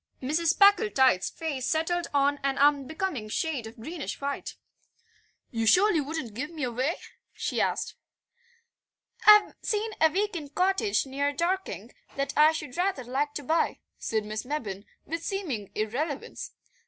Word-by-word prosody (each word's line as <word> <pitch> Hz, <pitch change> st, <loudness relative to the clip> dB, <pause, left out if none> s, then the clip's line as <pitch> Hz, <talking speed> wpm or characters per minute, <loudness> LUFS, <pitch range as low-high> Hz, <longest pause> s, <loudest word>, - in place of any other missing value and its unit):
Mrs. 310 Hz, +6 st, +1 dB
Packletide's 395 Hz, -, +5 dB
face 290 Hz, -6 st, -4 dB
settled 335 Hz, +2 st, 0 dB
on 285 Hz, 0 st, +2 dB
an 275 Hz, -1 st, 0 dB
unbecoming 290 Hz, -, +1 dB
shade 270 Hz, -1 st, -2 dB
of 225 Hz, -, -11 dB
greenish 315 Hz, +7 st, -5 dB
white. 280 Hz, 0 st, -4 dB, 1.0 s
"You 225 Hz, -1 st, -1 dB
surely 365 Hz, -, +5 dB
wouldn't 285 Hz, -6 st, -5 dB
give 275 Hz, +7 st, -4 dB
me 320 Hz, -4 st, -6 dB
away?" 255 Hz, +6 st, 0 dB, 0.4 s
she -, -, -2 dB
asked. -, -, -1 dB, 1.3 s
"I've 420 Hz, -1 st, +8 dB
seen 435 Hz, 0 st, -1 dB
a 320 Hz, -, +7 dB
week 410 Hz, +4 st, -1 dB
end 295 Hz, -4 st, -7 dB
cottage 385 Hz, +1 st, +2 dB
near 280 Hz, +2 st, -1 dB
Dorking 365 Hz, +5 st, -2 dB, 0.2 s
that 275 Hz, 0 st, -2 dB
I 305 Hz, +1 st, +7 dB
should 300 Hz, -4 st, -6 dB
rather 360 Hz, -7 st, 0 dB
like 275 Hz, +4 st, -2 dB
to 290 Hz, -, -4 dB
buy," 320 Hz, +5 st, +1 dB, 0.2 s
said 220 Hz, -2 st, -1 dB
Miss 215 Hz, +1 st, -4 dB
Mebbin 225 Hz, -8 st, -4 dB, 0.2 s
with 330 Hz, +1 st, -4 dB
seeming 290 Hz, -, -3 dB
irrelevance. 265 Hz, +7 st, -3 dB
295 Hz, 140 wpm, -28 LUFS, 260-340 Hz, 1.3 s, I've